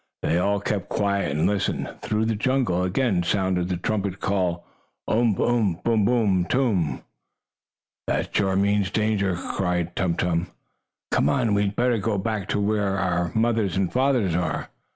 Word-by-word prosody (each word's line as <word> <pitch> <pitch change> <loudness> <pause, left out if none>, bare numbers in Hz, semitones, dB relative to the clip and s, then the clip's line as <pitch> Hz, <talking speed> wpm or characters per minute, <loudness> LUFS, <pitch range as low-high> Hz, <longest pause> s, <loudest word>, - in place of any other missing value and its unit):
They 85 - +2
all 100 +3 +1
kept 100 -1 -3
quiet 100 -3 0
and 75 +4 0
listened. 100 0 0
Through 110 +1 0
the 115 - +1
jungle 120 -5 +1
again 95 +1 +1
sounded 95 -1 0
the 90 - -1
trumpet 100 0 -2
call: 90 -3 -1 0.4
"Umph! 110 -3 +2
Umph! 110 -8 +1
Boom! 110 -3 +2
Boom! 100 -6 +2
Toom!" 95 - 0 1.0
"That - - -2
sure 95 -2 +2
means 100 0 +2
danger!" 105 -3 0
cried 90 -1 -2
Tum 90 -3 0
Tum. 90 0 0 0.6
"Come - - +2
on! 110 -3 +1
We 100 0 +2
had 100 +1 -3
better 120 -1 +2
go 105 +1 -1
back 100 0 -2
to - - 0
where 100 -1 0
our 90 -3 0
fathers 110 -3 0
and 95 -2 0
mothers 125 -8 +2
are." 90 +1 -2
100 Hz, 160 wpm, -24 LUFS, 90-110 Hz, 1.0 s, They